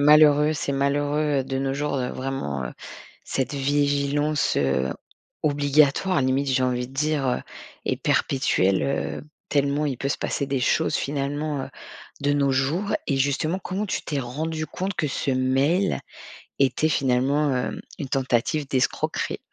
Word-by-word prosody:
malheureux, 150 Hz, 0 st, +6 dB
c'est 145 Hz, -2 st, -2 dB
malheureux, 145 Hz, +1 st, +1 dB
heu, -, -, -3 dB
de 135 Hz, 0 st, -3 dB
nos 135 Hz, 0 st, -1 dB
jours, 145 Hz, 0 st, -1 dB
heu, 125 Hz, -2 st, -1 dB
vraiment, 130 Hz, -, -3 dB
heu, -, -, -6 dB, 0.5 s
cette 135 Hz, +2 st, -2 dB
vigilance, 145 Hz, +1 st, +1 dB
heu, 65 Hz, -1 st, +1 dB, 0.5 s
obligatoire, 145 Hz, +3 st, +3 dB
limite, 130 Hz, +2 st, +1 dB
j'ai 130 Hz, -1 st, +2 dB
envie 125 Hz, -1 st, 0 dB
de -, -, -15 dB
dire, 150 Hz, 0 st, 0 dB
heu 125 Hz, -, 0 dB, 0.4 s
et -, -, 0 dB
perpétuelle, 100 Hz, -8 st, +2 dB
heu, 140 Hz, -, -2 dB, 0.3 s
tellement 140 Hz, +1 st, +1 dB
il 135 Hz, -4 st, -2 dB
peut 140 Hz, -, -1 dB
se -, -, -1 dB
passer 140 Hz, -, -2 dB
des 135 Hz, -1 st, -1 dB
choses 125 Hz, -, +2 dB
finalement, 145 Hz, +1 st, -2 dB
heu, -, -, -9 dB, 0.5 s
de 145 Hz, 0 st, +2 dB
nos 140 Hz, -1 st, +2 dB
jours. 150 Hz, +10 st, 0 dB
Et 140 Hz, -, +1 dB
justement, 145 Hz, +6 st, +1 dB
comment 195 Hz, +2 st, -3 dB
tu -, -, -2 dB
t'es 145 Hz, -3 st, -2 dB
rendue 155 Hz, +6 st, -3 dB
compte 190 Hz, +4 st, -3 dB
que 150 Hz, -, -1 dB
ce 135 Hz, -, -1 dB
mail 135 Hz, +9 st, +2 dB, 0.6 s
était 135 Hz, +3 st, +2 dB
finalement, 140 Hz, +1 st, +2 dB
heum 125 Hz, -2 st, -2 dB, 0.2 s
une 140 Hz, -, -4 dB
tentative 135 Hz, +2 st, 0 dB
d'escroquerie? 130 Hz, -2 st, 0 dB
140 Hz, 155 wpm, -24 LUFS, 130-150 Hz, 0.6 s, malheureux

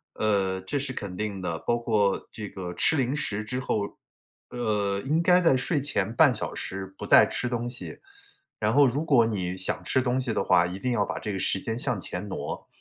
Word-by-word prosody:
呃， 95 Hz, -3 st, +1 dB
这 120 Hz, +10 st, -3 dB
是 140 Hz, -1 st, -1 dB
肯 100 Hz, -6 st, -5 dB
定 100 Hz, -1 st, -3 dB
的， 85 Hz, -2 st, -2 dB
包 120 Hz, -, 0 dB
括 105 Hz, -4 st, +1 dB
这 105 Hz, -2 st, -7 dB
个 90 Hz, -2 st, -6 dB
吃 155 Hz, -, +3 dB
零 130 Hz, +1 st, 0 dB
食 110 Hz, -8 st, -2 dB
之 125 Hz, +4 st, -3 dB
后， 105 Hz, -5 st, -2 dB, 0.5 s
呃， 105 Hz, -4 st, -1 dB
应 155 Hz, +4 st, +2 dB
该 180 Hz, +1 st, +5 dB
在 165 Hz, -6 st, +4 dB
睡 145 Hz, +4 st, 0 dB
前 115 Hz, -7 st, -1 dB
半 -, -, +5 dB
小 -, -, -3 dB
时 95 Hz, 0 st, -5 dB
不 -, -, -6 dB
再 -, -, +8 dB
吃 125 Hz, -, -2 dB
东 120 Hz, 0 st, -2 dB
西， 120 Hz, -, -7 dB, 0.6 s
然 110 Hz, +1 st, +1 dB
后 145 Hz, +1 st, +6 dB
如 135 Hz, +5 st, -1 dB
果 130 Hz, -7 st, +5 dB
你 95 Hz, -5 st, -2 dB
想 95 Hz, 0 st, -3 dB
吃 130 Hz, -, +2 dB
东 125 Hz, +1 st, 0 dB
西 125 Hz, -3 st, -1 dB
的 -, -, 0 dB
话 85 Hz, -, +4 dB
一 90 Hz, +2 st, -6 dB
定 125 Hz, +4 st, -1 dB
要 105 Hz, -4 st, +1 dB
把 -, -, -4 dB
这 105 Hz, -, -4 dB
个 95 Hz, -, -3 dB
时 95 Hz, -, +1 dB
间 115 Hz, +1 st, -3 dB
向 125 Hz, -5 st, -1 dB
前 90 Hz, +2 st, -5 dB
挪， 100 Hz, -, -5 dB
110 Hz, 240 characters per minute, -26 LUFS, 100-130 Hz, 0.6 s, 再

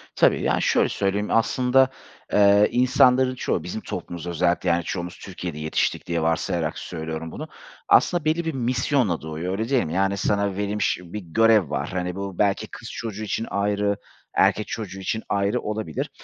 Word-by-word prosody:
Tabii, -, -, +4 dB
yani, -, -, +1 dB
şöyle -, -, +3 dB
söyleyeyim, 100 Hz, +1 st, -1 dB
aslında, 125 Hz, +3 st, +3 dB, 0.4 s
eee, 100 Hz, 0 st, +6 dB
insanların 130 Hz, +1 st, +4 dB
çoğu, -, -, -1 dB
bizim -, -, -5 dB
toplumuz 85 Hz, -1 st, -6 dB
özellikle, 85 Hz, +1 st, +1 dB
yani, 85 Hz, 0 st, +2 dB
çoğumuz 90 Hz, 0 st, -4 dB
Türkiye'de 90 Hz, -4 st, -6 dB
yetiştik 80 Hz, 0 st, -1 dB
diye 85 Hz, -1 st, 0 dB
varsayarak 80 Hz, 0 st, 0 dB
söylüyorum 80 Hz, -1 st, -5 dB
bunu, -, -, -7 dB, 0.4 s
aslında 175 Hz, -3 st, +4 dB
belli 160 Hz, +2 st, +1 dB
bir 160 Hz, -, -1 dB
misyonla 125 Hz, -, 0 dB
doğuyor, 80 Hz, +3 st, -4 dB
öyle 110 Hz, +5 st, -2 dB
değil 135 Hz, -3 st, +3 dB
mi? 80 Hz, -, -4 dB
Yani, 95 Hz, +1 st, +1 dB
sana 100 Hz, -1 st, 0 dB
verilmiş 105 Hz, 0 st, 0 dB
bir 90 Hz, +4 st, -6 dB
görev 105 Hz, 0 st, +3 dB
var. 70 Hz, -1 st, -2 dB
Hani, 90 Hz, -1 st, -3 dB
bu 100 Hz, -2 st, -5 dB
belki 100 Hz, -2 st, +1 dB
kız -, -, -9 dB
çocuğu 110 Hz, -2 st, -5 dB
için 110 Hz, +2 st, -2 dB
ayrı, 100 Hz, 0 st, 0 dB, 0.4 s
erkek 105 Hz, -, +3 dB
çocuğu 95 Hz, -4 st, -5 dB
için 110 Hz, +3 st, -2 dB
ayrı 100 Hz, +4 st, +1 dB
olabilir. 105 Hz, -7 st, -3 dB
100 Hz, 165 wpm, -24 LUFS, 85-115 Hz, 0.4 s, eee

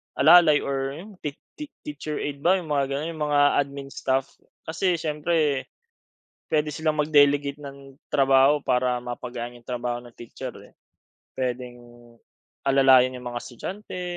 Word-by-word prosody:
alalay 165 Hz, -4 st, +6 dB
or 135 Hz, 0 st, -2 dB
'yong 190 Hz, +4 st, -12 dB
tea 145 Hz, -2 st, -5 dB, 0.2 s
tea 300 Hz, -, -5 dB, 0.2 s
teacher 150 Hz, +1 st, -5 dB
aid 145 Hz, -1 st, -4 dB
ba? 175 Hz, +6 st, +3 dB
'Yong 175 Hz, -5 st, -5 dB
mga 140 Hz, -2 st, +2 dB
gano'n, 140 Hz, +4 st, -3 dB
'yong 160 Hz, -, -10 dB
mga 145 Hz, -1 st, +2 dB, 0.2 s
admin 140 Hz, -1 st, -4 dB
staff. 135 Hz, 0 st, -1 dB, 0.3 s
Kasi 175 Hz, +3 st, 0 dB
siyempre, 150 Hz, -2 st, 0 dB, 0.8 s
puwede 150 Hz, -1 st, 0 dB
silang 155 Hz, -1 st, -1 dB
mag-delegate 145 Hz, -1 st, +3 dB
ng 140 Hz, -1 st, -11 dB, 0.2 s
trabaho 135 Hz, +1 st, +4 dB
para 125 Hz, -2 st, 0 dB
mapagaan 120 Hz, 0 st, -6 dB
'yong 120 Hz, -, -15 dB
trabaho 120 Hz, -1 st, -3 dB
ng 120 Hz, -1 st, -15 dB
teacher 120 Hz, -, -7 dB, 0.2 s
eh. -, -, -24 dB, 0.6 s
Puwedeng, 125 Hz, -1 st, -3 dB, 0.9 s
alalayan 135 Hz, -2 st, +5 dB
'yong 125 Hz, -1 st, -7 dB
mga 120 Hz, 0 st, -5 dB
estudyante, 185 Hz, -, -7 dB
140 Hz, 145 wpm, -25 LUFS, 130-150 Hz, 0.9 s, alalay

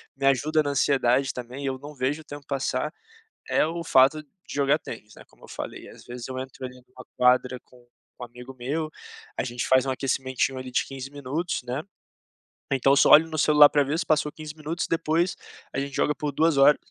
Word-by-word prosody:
me 135 Hz, -, -3 dB
ajuda 155 Hz, +4 st, +3 dB
na 145 Hz, -, -2 dB
ansiedade 130 Hz, -1 st, +2 dB
também 125 Hz, +3 st, -7 dB
e -, -, -3 dB
eu 130 Hz, -1 st, -3 dB
não 145 Hz, +1 st, -10 dB
vejo 135 Hz, +4 st, -1 dB
o -, -, -16 dB
tempo 145 Hz, -1 st, -10 dB
passar. 135 Hz, +2 st, -2 dB, 0.6 s
É -, -, +3 dB
o 170 Hz, +1 st, -4 dB
fato 140 Hz, +1 st, +4 dB
de 175 Hz, +5 st, -14 dB
jogar 140 Hz, +2 st, +2 dB
tênis, 110 Hz, -2 st, -10 dB
né, -, -, -13 dB
como -, -, -26 dB
eu -, -, -13 dB
falei. -, -, -7 dB
Às -, -, -14 dB
vezes 120 Hz, +1 st, -8 dB
eu 130 Hz, 0 st, -5 dB
entro, 130 Hz, 0 st, -7 dB
ali, 125 Hz, 0 st, -7 dB
numa 125 Hz, -, -14 dB
quadra 125 Hz, 0 st, +3 dB
com 125 Hz, -, -20 dB, 0.4 s
um -, -, -4 dB
amigo 125 Hz, +2 st, -11 dB
meu. 145 Hz, +6 st, -3 dB, 0.5 s
A -, -, 0 dB
gente 120 Hz, 0 st, -3 dB
faz 130 Hz, 0 st, +4 dB
um -, -, 0 dB
aquecimentinho, 130 Hz, 0 st, -1 dB
ali, 130 Hz, 0 st, -7 dB
de -, -, +1 dB
15 135 Hz, 0 st, -7 dB
minutos, 145 Hz, +3 st, -3 dB
né. 125 Hz, +5 st, -3 dB, 0.9 s
Então, 135 Hz, +1 st, +3 dB
só, -, -, +5 dB
olho 160 Hz, +2 st, +8 dB
no 155 Hz, -, -5 dB
celular 150 Hz, -1 st, +7 dB
pra 145 Hz, -1 st, +3 dB
ver 145 Hz, +4 st, -2 dB
se 165 Hz, -, -2 dB
passou 150 Hz, -1 st, +1 dB
15 155 Hz, -1 st, -9 dB
minutos. 160 Hz, +2 st, -3 dB
Depois, 165 Hz, +2 st, 0 dB, 0.3 s
a 135 Hz, -, -2 dB
gente 140 Hz, 0 st, -4 dB
joga 150 Hz, -, +2 dB
por 150 Hz, -1 st, -3 dB
2 160 Hz, -1 st, +2 dB
horas. 140 Hz, +2 st, +6 dB
140 Hz, 215 wpm, -25 LUFS, 130-150 Hz, 0.9 s, olho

